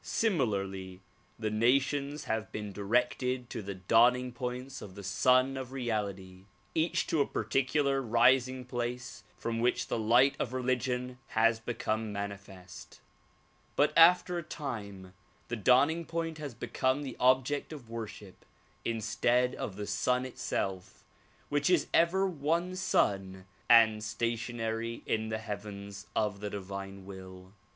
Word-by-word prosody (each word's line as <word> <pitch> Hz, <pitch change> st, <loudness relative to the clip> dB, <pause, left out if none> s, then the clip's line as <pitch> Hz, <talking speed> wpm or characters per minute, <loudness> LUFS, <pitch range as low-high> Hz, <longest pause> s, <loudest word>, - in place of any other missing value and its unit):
Similarly 100 Hz, -, -1 dB, 0.4 s
the 110 Hz, -1 st, -2 dB
nations 140 Hz, +6 st, +1 dB
have 110 Hz, -1 st, -3 dB
been 105 Hz, -1 st, -5 dB
directed 125 Hz, +4 st, 0 dB
to -, -, -4 dB
the 100 Hz, -1 st, -6 dB
dawning 120 Hz, +7 st, +4 dB
points 125 Hz, +2 st, -5 dB
of 95 Hz, -3 st, -10 dB
the 100 Hz, -, -9 dB
Sun 130 Hz, +7 st, +3 dB
of 130 Hz, -1 st, -6 dB
Reality, 100 Hz, -7 st, -4 dB, 0.3 s
each 160 Hz, +1 st, +1 dB
to 160 Hz, -, +1 dB
a -, -, +1 dB
particular 135 Hz, +5 st, +1 dB
rising 125 Hz, +2 st, +3 dB
place 120 Hz, -2 st, -4 dB
from 115 Hz, 0 st, -3 dB
which 120 Hz, +2 st, +1 dB
the -, -, -1 dB
light 120 Hz, +5 st, +4 dB
of 125 Hz, -, -2 dB
religion 125 Hz, 0 st, -1 dB
has 115 Hz, 0 st, +3 dB
become 110 Hz, -2 st, -2 dB
manifest; 100 Hz, -3 st, -8 dB, 0.8 s
but 150 Hz, +1 st, +3 dB
after 175 Hz, +1 st, +6 dB
a -, -, -6 dB
time 100 Hz, -, -6 dB, 0.4 s
the -, -, -1 dB
dawning 140 Hz, +9 st, +3 dB
point 165 Hz, -1 st, -3 dB
has 145 Hz, -6 st, -6 dB
become 130 Hz, +4 st, 0 dB
the 135 Hz, -, -6 dB
object 130 Hz, +4 st, +2 dB
of 140 Hz, -7 st, -9 dB
worship 110 Hz, -4 st, -8 dB, 0.4 s
instead 120 Hz, +2 st, +1 dB
of 95 Hz, -, -5 dB
the 105 Hz, +1 st, -5 dB
Sun 125 Hz, +6 st, 0 dB
itself 95 Hz, -7 st, -4 dB, 0.5 s
which 145 Hz, +3 st, +1 dB
is 180 Hz, -4 st, +4 dB
ever 180 Hz, +4 st, +4 dB
one 170 Hz, +1 st, -1 dB
Sun 95 Hz, -, 0 dB, 0.2 s
and 110 Hz, -2 st, +6 dB
stationary 115 Hz, +1 st, -3 dB
in 110 Hz, 0 st, -1 dB
the 110 Hz, -, -1 dB
heavens 100 Hz, -1 st, -7 dB
of 105 Hz, -2 st, 0 dB
the 105 Hz, 0 st, -4 dB
divine 100 Hz, -1 st, -7 dB
will. 95 Hz, -1 st, -11 dB
120 Hz, 135 wpm, -31 LUFS, 105-130 Hz, 0.8 s, after